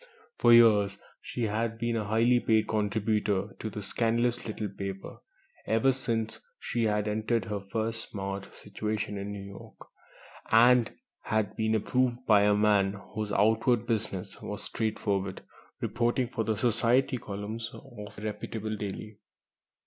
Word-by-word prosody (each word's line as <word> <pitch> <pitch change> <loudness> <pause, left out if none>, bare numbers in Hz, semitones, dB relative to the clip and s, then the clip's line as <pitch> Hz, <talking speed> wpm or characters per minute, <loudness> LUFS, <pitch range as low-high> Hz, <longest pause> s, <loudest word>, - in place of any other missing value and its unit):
For - - +5
years 105 -4 +6 0.2
she 120 - -4
had 110 +1 -1
been 120 0 -1
a 110 -2 -1
highly 115 +4 +3
paid 110 -2 +2
contributor 105 -2 0
to 110 - -4
the 105 -1 -6
scandalous 120 +3 0
little 110 -1 -3
paper, 95 0 -7 0.5
ever 115 +4 +3
since 115 -3 -2 0.2
she 120 -1 -1
had 105 -1 +1
entered 110 0 0
her 105 0 -3
first 110 +3 -2
"smart" 100 -1 -5
situation 105 0 -4
in 100 +1 -5
New 100 -1 -6
York, 100 0 -11 0.7
and 120 +1 +6 0.3
had 110 -3 -1
been 110 0 +1
approved 125 +3 0
by 105 -2 +6
a 105 0 +4
man 105 -2 +3 0.2
whose 105 -1 -3
outward 110 +3 +3
business 100 -4 -2
was 105 0 -5
straightforward 100 -4 -2 0.4
reporting 120 +2 0
for 115 - -2
the 110 -1 -1
"Society" 120 +3 +2
columns 105 +3 -5
of 115 -6 -11
a 105 - -8
reputable 110 0 -4
daily. 105 +1 -6
110 Hz, 140 wpm, -29 LUFS, 105-115 Hz, 0.7 s, years